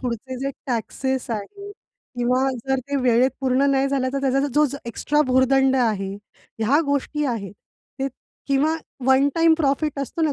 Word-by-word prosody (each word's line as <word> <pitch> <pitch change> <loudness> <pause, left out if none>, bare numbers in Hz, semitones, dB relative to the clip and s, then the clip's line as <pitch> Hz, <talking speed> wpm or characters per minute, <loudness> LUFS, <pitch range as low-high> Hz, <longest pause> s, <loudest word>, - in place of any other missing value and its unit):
पुढचे 255 +1 -4
जे 275 +1 -1 0.2
टॅक्सेस 260 +1 -2
आहे 400 - -6 0.5
किंवा 250 +2 +2 0.2
जर 265 0 +1
ते 285 - 0
वेळेत 250 +1 +4
पूर्ण 265 +1 +2
नाही 270 0 +2
झालं, 270 -2 0
तर 275 - -1
त्याचा 275 +1 +1
जो 300 +1 +5 0.2
एक्स्ट्रा 295 +5 0
भुर्दंड 260 +1 +3
आहे, 210 -6 0 0.5
ह्या 245 +8 +3
गोष्टी 285 +1 -1
आहेत. 220 -7 -3 0.5
ते 270 0 -1 0.4
किंवा 290 +4 +2 0.3
वन 265 +2 +5
टाईम 330 -1 +5
प्रॉफिट 290 -1 0
असतो 280 +4 -3
ना, 310 -2 +2
270 Hz, 155 wpm, -22 LUFS, 255-280 Hz, 0.5 s, जो